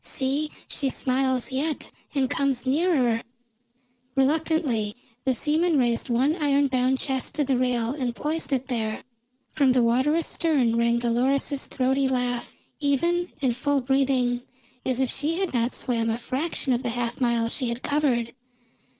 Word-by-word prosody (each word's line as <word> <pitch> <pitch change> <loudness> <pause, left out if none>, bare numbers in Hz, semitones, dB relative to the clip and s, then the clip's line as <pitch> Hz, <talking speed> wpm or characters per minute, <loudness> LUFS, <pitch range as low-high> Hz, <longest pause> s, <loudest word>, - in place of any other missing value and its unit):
See, 280 +3 -1 0.2
she 275 - -1
smiles 260 -1 0
yet, 290 +4 -2 0.2
and 270 -2 +2
comes 270 -2 0
nearer." 260 -5 +2 0.9
Reluctantly 275 -6 +1 0.3
the 260 -1 +2
seamen 315 +5 +2
raised 240 -2 +1
one 260 +6 +2
iron 285 -3 +2
bound 255 0 +2
chest 265 -1 -2
to 295 - +2
the 270 -1 +1
rail 245 -2 +1
and 255 -4 -3
poised 310 +2 -2
it 265 -1 0
there. 220 -4 -2 0.5
From 275 -4 +3
the 250 -1 +3
water 260 +6 +2
astern 310 -7 +1
rang 235 0 +2
Dolores's 255 +4 +1
throaty 265 +1 +1
laugh, 245 -2 -1 0.3
even 340 +5 +1
and 245 -3 +2
full 285 +2 +1
breathing, 255 -2 +1 0.4
as 255 -1 -1
if 265 -2 +1
she 305 +4 0
had 380 -6 -1
not 240 0 +1
swam 230 -2 -1
a 225 - 0
fraction 265 +3 -2
of 240 - 0
the 245 - -2
half 240 +1 -3
mile 235 -2 +2
she 245 +1 -1
had 235 +1 -4
covered. 265 -6 0
260 Hz, 155 wpm, -25 LUFS, 240-285 Hz, 0.9 s, From